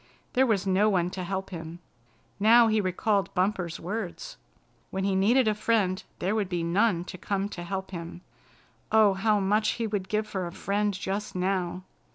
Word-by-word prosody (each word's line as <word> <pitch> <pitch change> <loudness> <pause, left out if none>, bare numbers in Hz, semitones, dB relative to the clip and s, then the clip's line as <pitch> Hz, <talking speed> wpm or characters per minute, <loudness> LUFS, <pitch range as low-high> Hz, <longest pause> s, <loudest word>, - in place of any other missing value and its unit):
There 265 0 +4
was 205 -5 +1
no 195 +3 +3
one 180 -3 +1
to 185 -1 -5
help 190 +2 -4
him. 165 -1 -7 0.6
Now 230 +3 +7
he 215 -1 +2
recalled 195 +1 0
Bumper's 180 -3 0
words. 215 - -5 0.5
When 190 - -3
he 195 0 +1
needed 225 +6 +4
a 215 - +3
friend 210 -3 0
there 190 +4 -1
would 210 -4 -1
be 175 -2 -1
none 175 +1 +2
to 180 0 -9
come 200 +1 -1
to 175 - -7
help 190 +2 -4
him. 170 -1 -7 0.7
Oh, 215 -2 +5
how 210 +2 +2
much 210 +2 +2
he 230 - -1
would 205 -3 -3
give 215 0 0
for 190 -4 -4
a - - -7
friend 205 +3 -1
just 195 +2 -4
now! 185 -1 -1
195 Hz, 185 wpm, -27 LUFS, 185-215 Hz, 0.7 s, Now